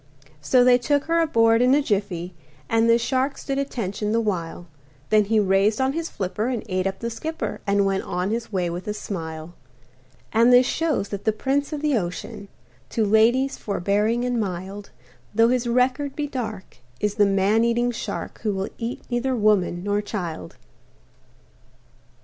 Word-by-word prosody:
So 245 - +4
they 250 0 +5
took 285 +3 +1
her 335 +1 +1
aboard 230 -8 +3
in 250 +2 +5
a 295 - +3
jiffy, 195 -6 -2 0.3
And 225 0 +2
the 230 - +6
shark 260 +3 -1
stood 275 0 -3
attention 215 -6 -3
the 230 - +3
while, 175 -6 -3 0.5
Then 215 -1 +5
he 220 +2 +2
raised 200 +2 +2
on 265 +1 +1
his 330 +1 -3
flipper 205 +4 -3
and 250 -4 -2
ate 185 -1 -1
up 195 0 -3
the 235 0 -3
skipper 245 -2 -4
And 200 0 +3
went 195 0 0
on 180 +3 -2
his 230 0 -3
way 185 -3 0
with 175 +3 -6
a 210 - -2
smile. 160 -5 -6 0.8
And 230 +2 +5
this 250 +1 +7
shows 305 -9 -1
that 200 -1 -5
the 220 - +2
prince 275 +7 -1
of 300 -1 -4
the 290 -6 +2
ocean, 180 +2 -6 0.4
To 220 - 0
ladies 235 +6 +3
forbearing 210 +5 0
and 245 -1 0
mild, 195 0 -5 0.5
Though 225 +1 +5
his 250 -1 0
record 255 +3 +1
be 295 - -2
dark, 220 - -6 0.2
is 210 -1 0
the 205 -1 +3
man 200 +3 +2
eating 240 +1 +1
shark 235 - -5
Who 210 -3 -1
will 190 +1 -3
eat 235 +1 -4
neither 250 +2 0
woman 205 -5 +2
nor 205 +1 0
child. 175 - -5
220 Hz, 175 wpm, -23 LUFS, 195-250 Hz, 0.8 s, this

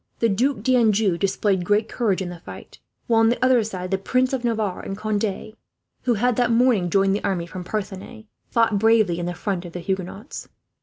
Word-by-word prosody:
The 230 - +2
Duc 240 +3 0
d'Anjou 220 -6 +3
displayed 195 -1 0
great 205 +4 +1
courage 200 -6 -1
in 180 - -5
the 175 -1 -9
fight; - - -12 0.3
while 230 -1 +3
on 225 0 +5
the 245 +2 +1
other 255 -3 +4
side 185 -3 -5
the 195 - +1
Princes 255 +6 0
of 260 -2 -2
Navarre 220 -5 -1
and 195 - -6
Conde, 215 0 -2 0.5
who 245 -2 +2
had 245 +2 +1
that 245 -1 +2
morning 230 -6 +3
joined 195 +2 +2
the 205 - -4
army 175 -3 -1
from 180 +1 -8
Parthenay, 210 +3 -6 0.2
fought 225 -3 +2
bravely 215 -5 +3
in 175 - -3
the 175 - -4
front 190 -3 -3
of 175 -2 -10
the 180 - -5
Huguenots. 190 +3 -5
210 Hz, 205 wpm, -23 LUFS, 190-230 Hz, 0.5 s, on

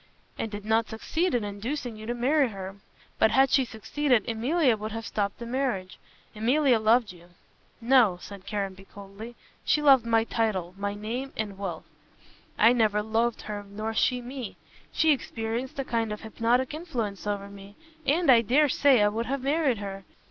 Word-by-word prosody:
"And 225 - -3
did 205 -1 -7
not 225 +1 +1
succeed 320 +9 -1
in 235 - 0
inducing 230 +5 -4
you 215 0 -9
to 240 - -2
marry 270 +4 +2
her. 195 -1 -8 0.4
But 220 - +5
had 270 +2 +4
she 270 - +4
succeeded, 245 +1 0
Emilia 250 +4 +2
would 215 +1 -6
have 225 0 -5
stopped 200 -1 -2
the 235 - -7
marriage. 235 -7 -2 0.4
Emilia 250 +3 +3
loved 220 0 +3
you." 175 -1 -17 0.5
"No," 230 -6 +4
said 195 +1 -11
Caranby 195 -2 -4
coldly, 200 +4 -11 0.3
"she - - +2
loved 275 -5 +6
my 225 -1 +3
title 215 -7 -1
and 185 +2 -21
my 200 0 -2
name 240 +6 -5
and 210 -2 -3
wealth. 190 -4 -5 0.7
I 230 - +6
never 215 -3 +2
loved 225 +2 0
her 210 -1 -5
nor 215 +2 -4
she 250 +2 +1
me. 250 -2 -7 0.3
She 320 -1 +4
exercised 235 0 -4
a 275 - -2
kind 230 -3 -1
of 210 - -5
hypnotic 235 +4 0
influence 235 - -4
over 200 -1 -2
me, 200 0 -12 0.3
and 310 +1 +3
I 235 -2 +7
dare 280 +6 +3
say 260 -4 +4
I - - +5
would 225 +3 -2
have 275 -1 -2
married 280 -3 +1
her. 195 -1 -6
225 Hz, 180 wpm, -27 LUFS, 205-255 Hz, 0.7 s, I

